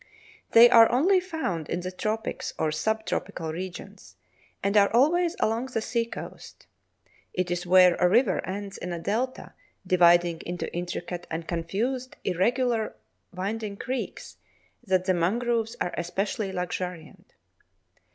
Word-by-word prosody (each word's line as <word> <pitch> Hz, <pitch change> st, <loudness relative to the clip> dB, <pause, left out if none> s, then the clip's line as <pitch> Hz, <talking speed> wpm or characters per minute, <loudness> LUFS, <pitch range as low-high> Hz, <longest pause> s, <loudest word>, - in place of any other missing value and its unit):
They 230 Hz, +1 st, +10 dB
are 230 Hz, -2 st, +7 dB
only 360 Hz, +10 st, +4 dB
found 320 Hz, -, -4 dB
in 175 Hz, -, -2 dB
the 185 Hz, +1 st, -5 dB
tropics 215 Hz, +4 st, -3 dB
or 155 Hz, -, 0 dB
sub 220 Hz, +8 st, -1 dB
tropical 160 Hz, -2 st, -3 dB
regions, 180 Hz, +1 st, -8 dB, 0.5 s
and 200 Hz, +1 st, 0 dB
are 200 Hz, -1 st, +5 dB
always 330 Hz, +9 st, +3 dB
along 225 Hz, +4 st, 0 dB
the 250 Hz, -3 st, -2 dB
sea 230 Hz, +1 st, -1 dB
coast. 230 Hz, -, -10 dB, 0.7 s
It 180 Hz, -1 st, -1 dB
is 175 Hz, 0 st, -2 dB
where 180 Hz, 0 st, +7 dB
a 180 Hz, -, +3 dB
river 220 Hz, 0 st, +3 dB
ends 200 Hz, +1 st, -6 dB
in 180 Hz, 0 st, -4 dB
a -, -, -3 dB
delta, 235 Hz, +9 st, -3 dB, 0.3 s
dividing 175 Hz, -2 st, +4 dB
into 175 Hz, 0 st, -5 dB
intricate 175 Hz, 0 st, -5 dB
and 165 Hz, 0 st, -5 dB
confused 225 Hz, +10 st, -2 dB
irregularly 230 Hz, +5 st, 0 dB, 0.4 s
winding 205 Hz, +2 st, -4 dB
creeks, 260 Hz, +3 st, -5 dB, 0.5 s
that 185 Hz, -4 st, +1 dB
the 185 Hz, -, +3 dB
mangroves 225 Hz, +6 st, 0 dB
are 175 Hz, -, -2 dB
especially 195 Hz, +3 st, -2 dB
luxuriant. 180 Hz, -3 st, -6 dB
195 Hz, 135 wpm, -26 LUFS, 175-235 Hz, 0.7 s, They